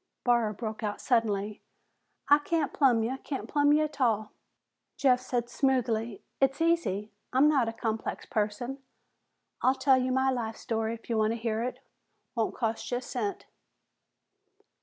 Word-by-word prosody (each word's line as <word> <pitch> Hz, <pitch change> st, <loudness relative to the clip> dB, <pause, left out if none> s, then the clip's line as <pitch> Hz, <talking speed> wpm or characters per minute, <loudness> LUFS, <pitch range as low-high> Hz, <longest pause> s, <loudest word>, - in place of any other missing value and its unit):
Barr 235 Hz, -3 st, +3 dB
broke 220 Hz, +1 st, -5 dB
out 210 Hz, -2 st, -3 dB
suddenly, 210 Hz, -4 st, 0 dB, 0.7 s
"I 290 Hz, +1 st, +7 dB
can't 300 Hz, 0 st, -1 dB
plumb 245 Hz, -6 st, +4 dB
ya. 255 Hz, +4 st, -2 dB
Can't 275 Hz, -, -4 dB
plumb 290 Hz, -1 st, +3 dB
ya 305 Hz, +1 st, +4 dB
a'tall!" 230 Hz, -8 st, 0 dB, 0.7 s
Jeff 255 Hz, -2 st, +4 dB
said 245 Hz, -2 st, -2 dB
smoothly, 240 Hz, -4 st, 0 dB, 0.2 s
"It's 270 Hz, +1 st, +2 dB
easy. 325 Hz, -, +1 dB, 0.2 s
I'm 265 Hz, +4 st, +5 dB
not 270 Hz, -7 st, +3 dB
a -, -, -3 dB
complex 225 Hz, -1 st, -3 dB
person. 225 Hz, +5 st, -2 dB, 0.8 s
I'll 260 Hz, +1 st, +4 dB
tell 265 Hz, -1 st, +4 dB
you 255 Hz, 0 st, 0 dB
my 265 Hz, +1 st, +2 dB
life 225 Hz, -3 st, -3 dB
story 225 Hz, 0 st, -2 dB
if 230 Hz, -, -16 dB
you 230 Hz, -2 st, 0 dB
want 215 Hz, +1 st, +2 dB
to -, -, -3 dB
hear 225 Hz, -1 st, -1 dB
it. 250 Hz, +2 st, -4 dB, 0.5 s
Won't 225 Hz, -2 st, -1 dB
cost 225 Hz, -2 st, -2 dB
you 245 Hz, -, 0 dB
a -, -, -4 dB
cent." 225 Hz, -5 st, -3 dB
240 Hz, 160 wpm, -29 LUFS, 220-265 Hz, 0.8 s, I